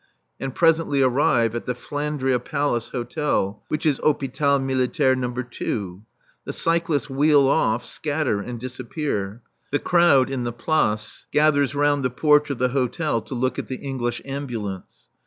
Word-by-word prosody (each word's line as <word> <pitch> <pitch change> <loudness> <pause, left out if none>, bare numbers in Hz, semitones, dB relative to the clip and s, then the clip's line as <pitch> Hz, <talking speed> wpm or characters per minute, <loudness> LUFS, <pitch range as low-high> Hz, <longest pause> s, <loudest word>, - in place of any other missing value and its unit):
I. - - -4
and 135 - -5
presently 165 -4 +3
arrive 125 -3 +2
at 120 - -5
the 125 - -1
Flandria 145 -1 -1
Palace 125 -2 -1
Hotel, 120 -5 -2
which 155 +1 -3
is 145 -4 +2
Hôpital 140 -1 +1
Militaire 130 0 +1
No. 130 -1 -1
II. 105 -7 -4 0.4
The - - -5
cyclists 165 -3 +1
wheel 145 0 +4
off, 120 -5 +1
scatter 145 -8 -1
and 120 +3 -6
disappear. 125 -4 -4 0.3
The 145 - +3
crowd 160 -6 +4
in 130 -2 -2
the 120 - -2
Place 110 -5 -1
gathers 145 -2 +3
round 145 -1 +2
the 130 - +1
porch 150 +3 +3
of 140 - -2
the 125 +1 +1
hotel 130 0 0
to 130 - -7
look 130 +1 -1
at - - -5
the 130 - -4
English 125 -3 -4
Ambulance. 120 -9 -6
135 Hz, 155 wpm, -23 LUFS, 120-145 Hz, 0.4 s, wheel